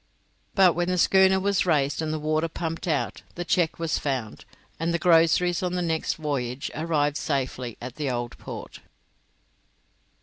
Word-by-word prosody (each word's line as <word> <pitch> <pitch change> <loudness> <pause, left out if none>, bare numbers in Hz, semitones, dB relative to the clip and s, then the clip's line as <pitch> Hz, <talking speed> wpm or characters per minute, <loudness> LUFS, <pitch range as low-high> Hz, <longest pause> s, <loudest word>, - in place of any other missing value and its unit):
But 185 -4 +6
when 175 0 -1
the 180 0 0
schooner 190 +1 +5
was 195 -1 +1
raised 145 -2 +2
and 155 -1 -2
the 155 - -1
water 155 +1 0
pumped 165 +1 -4
out, 155 -4 -1
the 175 - -4
cheque 170 -2 +1
was 165 -2 -1
found, 130 -7 -3 0.3
and 165 +1 0
the 170 - +1
groceries 170 0 +4
on 180 -1 -1
the 180 - 0
next 160 -2 -1
voyage 140 -4 -3
arrived 150 -2 0
safely 130 -4 -3
at 125 +2 -8
the 150 -3 -1
Old 120 -1 -3
Port. - - -8
160 Hz, 165 wpm, -25 LUFS, 140-175 Hz, 0.3 s, But